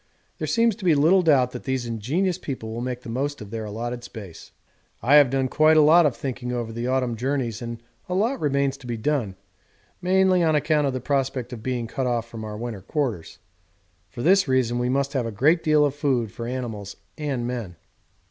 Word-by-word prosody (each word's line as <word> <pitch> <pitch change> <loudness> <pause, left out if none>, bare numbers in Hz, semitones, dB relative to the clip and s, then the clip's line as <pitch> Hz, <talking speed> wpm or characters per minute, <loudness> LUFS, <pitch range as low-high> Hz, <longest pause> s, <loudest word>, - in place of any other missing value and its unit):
There - - -2
seems 230 -3 +2
to 210 - -11
be 170 -4 +4
little 165 +7 +5
doubt 135 -7 +3
that - - -8
these 130 -2 -1
ingenious 140 - -1
people 115 -5 -5
will 115 - -4
make 125 0 -4
the - - -11
most 140 +5 -2
of 105 -1 -10
their 110 -1 -4
allotted 120 +3 -5
space. 100 -8 -10 0.5
I 140 +5 +6
have 145 -4 +6
done 135 0 0
quite 155 +4 +4
a - - +8
lot 160 +2 +6
of 135 - -3
thinking 125 -2 -4
over 120 -2 -3
the 120 +2 -3
autumn 130 -2 0
journeys 125 -1 -2
and 120 0 -5 0.3
a 180 - -1
lot 235 +7 +1
remains 140 -2 0
to 125 - -12
be 120 -1 -3
done, 115 -5 -1 0.7
mainly 185 0 +3
on 160 -2 +3
account 150 0 +2
of 135 - -1
the 130 - -3
prospect 130 -2 -1
of 115 - -7
being 125 -1 -2
cut 130 +3 -3
off 120 -2 -1
from 115 -1 -8
our 105 -1 -6
winter 115 -3 -5
quarters; 120 - -3 0.7
for 120 +6 -7
this 190 +1 +4
reason 125 -2 +1
we 125 0 0
must 140 +1 0
have 130 -4 0
a - - -4
great 150 - +3
deal 155 -2 +4
of 140 - 0
food 130 -7 0
for 115 +3 -6
animals 115 -6 -5 0.2
and 140 -6 -3
men. 120 -8 -4
130 Hz, 215 wpm, -24 LUFS, 115-150 Hz, 0.7 s, a